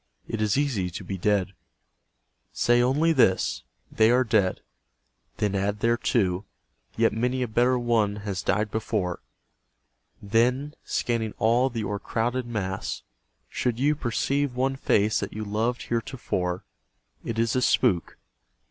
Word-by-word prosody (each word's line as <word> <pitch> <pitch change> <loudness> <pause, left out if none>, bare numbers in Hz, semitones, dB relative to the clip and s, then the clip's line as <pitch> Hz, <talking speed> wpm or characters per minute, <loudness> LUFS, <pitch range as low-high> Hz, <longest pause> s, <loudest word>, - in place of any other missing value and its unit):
It 115 - -3
is 105 +1 +2
easy 125 -11 0
to 85 - -7
be 95 -2 -5
dead. 100 0 +1 1.0
Say 120 0 +3
only 145 +7 +3
this, 110 -10 +2 0.2
" - - -41
They 110 0 +6
are 125 +2 +4
dead." 110 -6 +1 0.8
Then 105 -1 0
add 100 +2 -1
thereto, 110 -5 +1 0.3
" - - -36
Yet - - +3
many 125 +3 0
a - - -2
better 120 +3 +2
one 115 -4 +1
has 95 -3 -2
died 105 0 0
before." 105 -5 -2 1.0
Then, 125 +8 +1
scanning 115 -3 -1
all 120 +4 +3
the 115 -3 -4
o'ercrowded 115 +5 -2
mass, 95 -5 -3 0.4
should 120 -2 -2
you 145 +3 +3
Perceive 140 +1 -1
one 135 +1 0
face 105 -5 +2
that - - -4
you 110 - -4
loved 110 +4 -1
heretofore, 115 -7 -2 0.6
It 115 - -4
is 115 0 +1
a 130 - +2
spook. 110 -8 +2
115 Hz, 140 wpm, -26 LUFS, 100-125 Hz, 1.0 s, They